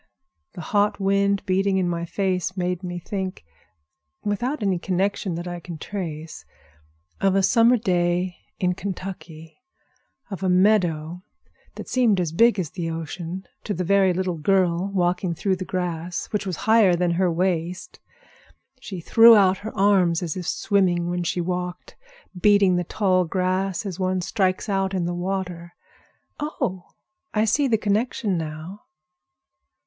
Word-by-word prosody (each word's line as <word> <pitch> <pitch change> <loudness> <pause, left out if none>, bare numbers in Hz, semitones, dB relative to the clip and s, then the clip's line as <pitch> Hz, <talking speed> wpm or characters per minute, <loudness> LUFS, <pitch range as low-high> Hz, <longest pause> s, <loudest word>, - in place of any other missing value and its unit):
The 180 - -7
hot 205 0 +2
wind 200 0 +1
beating 190 +1 +1
in 185 -2 +1
my 170 -1 -2
face 185 +1 -2
made 180 -1 -1
me 175 -1 -5
think—without 180 - -6
any 190 -3 +1
connection 190 0 -1
that 175 +2 -5
I 175 0 -5
can 170 -1 -8
trace 160 -4 -6 0.8
of 195 -1 +2
a 195 - +3
summer 230 +5 +5
day 180 -3 0 0.2
in 180 -1 +1
Kentucky, 180 - -8 0.7
of 195 - -5
a 190 - 0
meadow 180 -4 +2 0.5
that - - -8
seemed 235 -7 +2
as 170 -4 -1
big 230 +6 +4
as 165 -5 -3
the 170 -3 -4
ocean 165 +3 -5 0.2
to 210 - -3
the 180 - -2
very 195 +1 +3
little 180 -2 -2
girl 185 +1 +1
walking 180 -1 0
through 190 +3 0
the 185 - -5
grass, 175 -1 -3
which 205 -2 -2
was 185 - -2
higher 220 -5 +5
than 175 0 +1
her 180 +1 +1
waist. 175 0 -2 0.8
She 190 -8 -7
threw 230 +6 +7
out 190 -2 +4
her 220 +2 -8
arms 190 -4 +3
as 165 -3 -3
if 180 -2 -5
swimming 180 -4 +1
when 175 0 -1
she 175 +1 -1
walked, 180 0 -4 0.4
beating 200 0 +4
the 180 - 0
tall 185 0 +1
grass 185 +2 -1
as 190 -2 -5
one 185 0 0
strikes 185 +1 0
out 195 -1 0
in 180 -2 0
the 175 - -2
water. 175 -1 -4 0.6
Oh, 190 - -3 0.5
I 215 +1 +3
see 275 +6 +2
the 225 -3 +2
connection 210 -1 0
now!" 160 +4 -6
185 Hz, 150 wpm, -23 LUFS, 175-195 Hz, 0.8 s, threw